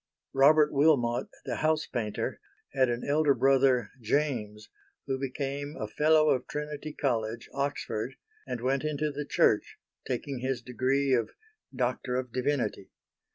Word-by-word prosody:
Robert 150 +3 +6
Wilmot, 135 -5 +3 0.2
the - - -3
house 155 0 +1
painter, 110 -4 -3 0.3
had 130 -2 +3
an 120 0 -2
elder 145 -1 +3
brother 135 -2 +3
James 110 -5 -1 0.4
who 135 -1 -2
became 140 +2 -4
a 110 - -3
Fellow 155 +6 +4
of 130 - 0
Trinity 150 0 -5
College, 115 -5 -1
Oxford, 135 -3 -2 0.3
and 120 - -4
went 135 +3 0
into 150 0 -1
the 145 +1 -4
Church, - - +2 0.3
taking 130 +1 -3
his 130 -1 -2
degree 130 +2 +1
of 115 -3 +2 0.4
Doctor 125 0 -1
of 125 -1 -2
Divinity. 125 -7 -1
135 Hz, 135 wpm, -29 LUFS, 120-145 Hz, 0.4 s, Robert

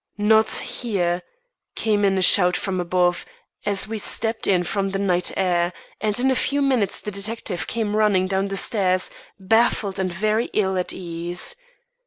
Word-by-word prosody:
"Not 220 +1 +4
here!" 180 -7 -1 0.5
came 210 -2 0
in 195 -1 +2
a 190 - +1
shout 180 -1 +6
from 185 -2 -3
above, 175 0 +1 0.4
as 200 -1 +1
we 220 0 -4
stepped 225 +2 -2
in 180 -2 +3
from 195 +2 -2
the 195 - -3
night 180 -3 0
air; 175 -2 +1 0.3
and 210 +1 -1
in 265 +2 +2
a - - +1
few 285 +3 0
minutes 250 -8 +1
the 210 - -5
detective 200 -2 -3
came 215 -2 -2
running 210 -4 +2
down 190 +1 -1
the 195 0 -4
stairs, 185 -3 +1 0.3
baffled 205 -1 +1
and 185 -1 -1
very 215 +6 0
ill 190 -3 +1
at 180 -1 -2
ease. 175 - -1
195 Hz, 170 wpm, -22 LUFS, 185-215 Hz, 0.5 s, shout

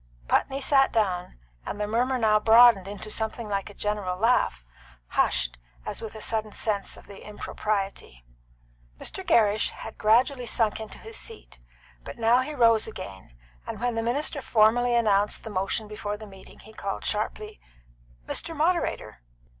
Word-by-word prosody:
Putney 270 +1 +1
sat 270 0 +4
down, 185 - -1 0.3
and 205 - -6
the 210 - 0
murmur 245 +5 +1
now 215 -3 +3
broadened 225 -3 +6
into 205 +1 -7
something 220 +1 -3
like 200 0 -2
a 205 - -13
general 205 -3 -2
laugh, 200 - +1 0.4
hushed - - +1 0.3
as - - -4
with 220 -1 -7
a 220 - -8
sudden 215 -1 -1
sense 205 -3 -1
of - - -14
the 200 -1 -12
impropriety. 200 - -4 0.7
Mr. 380 - -3
Gerrish 215 - +3
had 220 - -10
gradually 245 +4 +3
sunk 220 -2 +1
into 220 -1 -8
his 445 0 -8
seat, 450 - -8 0.4
but - - -9
now 230 +2 +4
he 295 +4 -3
rose 230 -4 +4
again, 95 - -9 0.3
and - - -5
when 245 +1 0
the 225 - -1
minister 275 +5 -1
formally 240 +1 +3
announced 210 -3 +2
the 220 - -7
motion 195 +3 -2
before 210 -1 -5
the 215 - -10
meeting, 195 -2 -14
he 220 - -15
called, 195 -2 -5
sharply, 215 0 -3 0.7
"Mr. 330 -1 -2
Moderator!" 335 - 0
215 Hz, 160 wpm, -26 LUFS, 205-240 Hz, 0.7 s, broadened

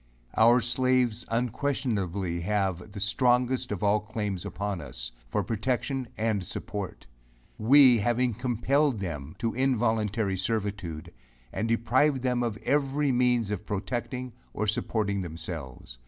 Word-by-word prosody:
Our 120 +3 +6
slaves 125 -1 +1
unquestionably 110 - -1
have 95 0 -1
the 105 - -6
strongest 125 +4 +2
of 105 0 -3
all 105 +1 +4
claims 105 -4 -4
upon 100 -2 -3
us, - - -7 0.2
for - - 0
protection 130 +3 -1
and 110 -3 0
support; 100 +2 -5 0.5
we 130 +1 +7
having 120 +3 +1
compelled 125 +3 +1
them 80 -6 -5
to 115 -2 -1
involuntary 110 -5 +1
servitude, 100 -5 -3 0.4
and 110 +4 -1
deprived 130 +4 +2
them 125 -1 +1
of 115 -3 -1
every 140 0 +1
means 120 -3 +2
of 105 0 -4
protecting 120 +5 -3 0.2
or 110 - 0
supporting 105 -1 0
themselves. 80 -8 -7
110 Hz, 125 wpm, -28 LUFS, 100-125 Hz, 0.5 s, we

